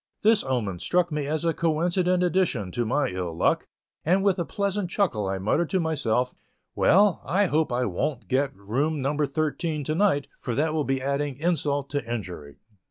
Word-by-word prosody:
This 220 0 +5
omen 115 -9 -2
struck 175 - +1
me 150 -2 -2
as 155 +2 -1
a 165 - +2
coincident 175 +3 +1
addition 175 - +1
to 120 +4 -1
my 145 +5 +1
ill 90 -3 -4
luck, - - +1 0.4
and 185 +4 +2
with 195 -2 +2
a 170 - 0
pleasant 200 -1 -2
chuckle 170 - 0
I 95 0 -1
muttered 145 - 0
to 190 - +1
myself, 135 -7 0 0.4
"Well, 200 -1 +4
I 195 +7 +2
hope 160 -5 +1
I 125 +1 +1
wont 120 - -2
get 135 +5 +1
room 130 +11 -1
number 145 +2 0
thirteen 155 +1 -2
to 155 - -1
night, 160 -6 +2
for 120 - -3
that 155 +2 +1
will 155 -2 0
be 135 -1 -1
adding 140 0 -1
insult 145 -3 -1
to 145 0 -1
injury." 90 - -5
150 Hz, 185 wpm, -26 LUFS, 125-175 Hz, 0.4 s, This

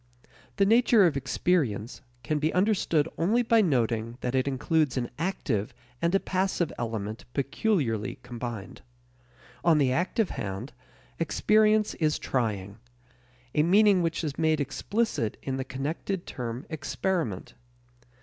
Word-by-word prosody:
The 200 - +3
nature 225 -1 +5
of 165 - +2
experience 135 - 0 0.2
can 150 +5 0
be 155 +2 +1
understood 180 -6 +2
only 220 +9 +3
by 230 -1 +4
noting 115 - 0
that 125 - -2
it 130 +1 +1
includes 140 0 +1
an 120 -1 -2
active 135 - -2 0.3
and 170 +3 +2
a - - +5
passive 185 -3 -1
element 110 -2 -4
peculiarly 135 - 0
combined. 120 -4 -6 0.8
On 165 -2 +5
the 135 -3 +3
active 180 - 0
hand, 105 +5 -5 0.5
experience 215 +5 +3
is 155 -2 0
trying 105 -5 -2 0.7
a 150 - +3
meaning 195 +3 +5
which 165 0 -1
is 145 -3 -4
made 160 -1 +2
explicit 145 - -1
in 135 -1 -2
the 135 - -2
connected 150 +8 -4
term 120 +1 -5
experiment. 160 - -2
150 Hz, 130 wpm, -27 LUFS, 120-185 Hz, 0.8 s, nature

